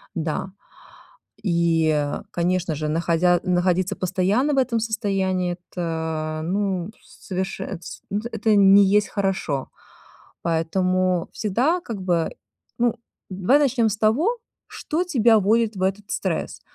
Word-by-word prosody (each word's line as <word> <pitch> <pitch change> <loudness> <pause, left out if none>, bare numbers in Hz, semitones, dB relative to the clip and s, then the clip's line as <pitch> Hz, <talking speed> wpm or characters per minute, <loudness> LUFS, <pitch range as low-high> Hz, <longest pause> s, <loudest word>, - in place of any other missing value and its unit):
Да, 165 +3 -3 0.9
и, 165 -4 +2 0.2
конечно 175 -1 0
же, 150 +1 -3
находя 170 +2 +2
находиться 180 0 +1
постоянно 200 +10 +1
в - - -1
этом 250 -3 +2
состоянии- 190 -5 -1 0.2
это, 160 -2 -3
ну, 190 +1 -1
соверше 190 +1 -5
это 190 - -6
с - - -9
н 205 +1 -1
это 220 -1 +2
не 200 0 +7
есть 210 - +1
хорошо. 190 -9 -2 0.7
Поэтому 180 +2 +1
всегда, 255 - 0
как 230 -8 -6
бы, 175 -3 +1 0.5
ну, 240 -1 +2 0.3
давай 195 +10 +3
начнём 255 -5 +2
с 205 - -3
того, 295 - +2 0.3
что 330 +4 -2
тебя 235 -9 +4
вводит 220 +2 +2
в - - -5
этот 195 +2 0
стресс? - - -3
190 Hz, 125 wpm, -23 LUFS, 170-220 Hz, 0.9 s, не